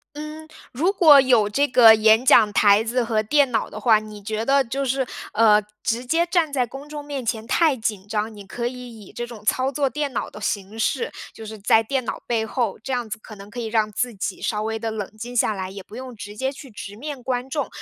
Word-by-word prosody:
嗯， 305 +1 -8 0.2
如 325 +10 +1
果 315 -7 +7
有 245 -6 +4
这 280 +7 +2
个 235 -3 +8
演 220 +2 +4
讲 225 -5 +6
台 205 +1 +5
子 240 +2 0
和 220 -2 0
电 285 +4 +3
脑 225 -2 0
的 215 - -8
话， 220 0 +5
你 215 -1 -10
觉 215 +2 -3
得 275 +1 +4
就 270 +3 -3
是 265 0 -1 0.3
呃 215 -1 +5 0.2
直 240 +2 -1
接 330 +7 +2
站 335 -4 +1
在 255 -3 +1
公 270 +4 -10
众 295 -1 -7
面 285 -3 -5
前 220 0 -3
太 320 -5 +3
紧 215 -4 -4
张， 215 +1 -2
你 205 -1 -11
可 235 +5 -4
以 245 -2 -8
以 - - -14
这 240 - -5
种 235 -3 -11
操 255 +5 +1
作 280 0 0
电 290 -1 -3
脑 - - -3
的 - - -11
形 205 0 -3
式， 465 - -1 0.2
就 220 - -10
是 220 0 -8
在 215 +2 +4
电 255 +3 -2
脑 - - -4
背 225 -2 0
后， 225 -2 -2
这 265 - -3
样 245 -3 -2
子 220 - -4
可 220 - -12
能 200 0 -12
可 245 - -8
以 235 - -3
让 220 -1 0
自 245 +3 -2
己 195 -1 -4
稍 210 -1 -2
微 220 +1 -2
地 225 0 -3
冷 210 -3 -5
静 240 +3 -7
下 225 - +3
来， 190 -2 -5
也 195 0 -8
不 200 - -14
用 255 0 -8
直 205 0 -9
接 265 +3 -1
去 275 0 -12
直 205 -2 -9
面 280 +3 -7
观 250 +1 -2
众， 285 0 -2
235 Hz, 265 characters per minute, -22 LUFS, 215-265 Hz, 0.3 s, 个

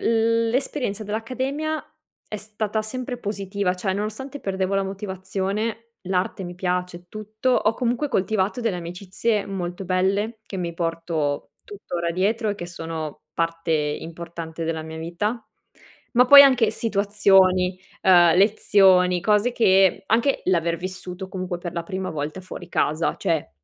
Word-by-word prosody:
l'esperienza 230 0 0
dell'accademia 260 +8 -3 0.4
è 215 - -4
stata 215 +1 -3
sempre 245 +3 -5
positiva, 200 -3 -2
cioè, 190 +1 -2
nonostante 220 +8 -4
perdevo 190 0 -1
la 195 - +2
motivazione, 195 +3 -3
l'arte 185 0 -1
mi 175 0 -7
piace 180 -1 -2
e 175 - -14
tutto, 215 +5 -3
ho 225 -3 +2
comunque 245 +4 -1
coltivato 205 +2 0
delle 225 -6 0
amicizie 185 +5 -2
molto 185 -1 -4
belle 200 +5 0
che 195 - -6
mi 170 -2 -3
porto 165 -4 -2
tuttora 175 - -4
dietro 215 +5 0
e 205 - -2
che 175 -3 -7
sono 165 -3 -6
parte 165 0 -2
importante 165 +2 -4
della 160 -1 -2
mia 160 0 -8
vita. 205 +8 -2 0.7
Ma 250 +1 +6
poi 280 +2 +11
anche 255 -5 +5
situazioni, 195 -4 +3 0.2
uhm, 175 -3 +6
lezioni, 190 -3 +4
cose 210 +5 +2
che 195 -4 +4
anche 235 +5 +2
l'aver 170 -2 +1
vissuto 185 +1 -6
comunque 185 -2 -4
per 175 -1 -6
la 170 - -3
prima 190 +2 -4
volta 155 +3 -4
fuori 185 - -9
casa 155 +3 0
cioè 160 - -1
190 Hz, 140 wpm, -23 LUFS, 175-220 Hz, 0.7 s, poi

